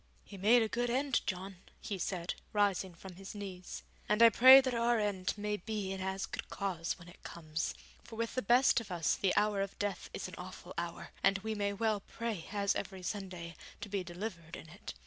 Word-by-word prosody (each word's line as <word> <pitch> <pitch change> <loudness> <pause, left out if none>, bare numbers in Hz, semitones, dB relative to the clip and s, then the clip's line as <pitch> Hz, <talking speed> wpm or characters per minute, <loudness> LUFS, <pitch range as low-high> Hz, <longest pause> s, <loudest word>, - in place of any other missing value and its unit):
'He 205 - -11
made 220 +5 +5
a - - 0
good 240 +2 -1
end, 265 +1 +1
John,' 190 0 -3 0.2
he 200 -3 -4
said, 180 -1 -2 0.2
rising 195 -3 +1
from 180 +1 -11
his 195 +2 -9
knees, 190 -3 -7 0.3
'and 210 +2 +5
I 230 - +11
pray 260 +4 +10
that 260 -2 0
our 235 0 +2
end 200 -3 -1
may 210 0 -1
be 205 0 -3
in 190 -1 -4
as 190 0 -2
good - - -6
cause 180 -4 -2
when 175 -1 -14
it 175 - -15
comes. 160 -1 -4 0.3
For 235 - -11
with 230 0 -2
the 255 - 0
best 245 +3 +5
of 225 - -10
us 170 -3 +1
the 190 -2 +1
hour 210 -1 +2
of 195 -1 -4
death 205 -1 -3
is - - -5
an - - -11
awful - - -9
hour, - - -5
and 195 - +4
we 220 0 -1
may 205 -1 0
well 215 0 0
pray, 220 -4 -5
as 200 -1 +1
every 190 -2 -5
Sunday, 180 -4 -5 0.3
to 205 - -6
be 195 -2 -1
delivered 175 -2 -6
in 160 - -10
it. - - -9
200 Hz, 215 wpm, -33 LUFS, 185-220 Hz, 0.3 s, I